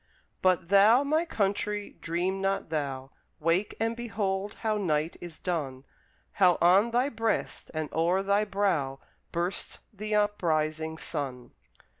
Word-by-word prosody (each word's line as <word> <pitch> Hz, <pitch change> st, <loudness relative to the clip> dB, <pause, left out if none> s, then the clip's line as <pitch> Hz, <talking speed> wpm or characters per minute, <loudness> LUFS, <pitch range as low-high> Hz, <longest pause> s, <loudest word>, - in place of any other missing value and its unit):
But 180 Hz, -2 st, +2 dB
thou, 210 Hz, +7 st, +6 dB
my 310 Hz, +4 st, +1 dB
country, 205 Hz, -, -1 dB
dream 180 Hz, +3 st, -1 dB
not 195 Hz, -3 st, -1 dB
thou! 135 Hz, -3 st, -3 dB, 0.3 s
Wake, 170 Hz, +6 st, +1 dB
and 225 Hz, +1 st, 0 dB
behold 205 Hz, -4 st, -2 dB
how 220 Hz, -2 st, +1 dB
night 160 Hz, -4 st, 0 dB
is 175 Hz, -2 st, -8 dB
done, 140 Hz, -7 st, -3 dB, 0.5 s
How 180 Hz, -3 st, +4 dB
on 190 Hz, +6 st, +5 dB
thy 245 Hz, +3 st, +2 dB
breast, 225 Hz, -4 st, -2 dB
and 155 Hz, -1 st, -1 dB
o'er 175 Hz, +4 st, +2 dB
thy 200 Hz, +1 st, +2 dB
brow, 190 Hz, -10 st, 0 dB, 0.3 s
Bursts 175 Hz, +2 st, -2 dB, 0.2 s
the 210 Hz, +1 st, -3 dB
uprising 160 Hz, -6 st, 0 dB
sun! 135 Hz, -7 st, -5 dB
190 Hz, 130 wpm, -28 LUFS, 160-210 Hz, 0.5 s, thou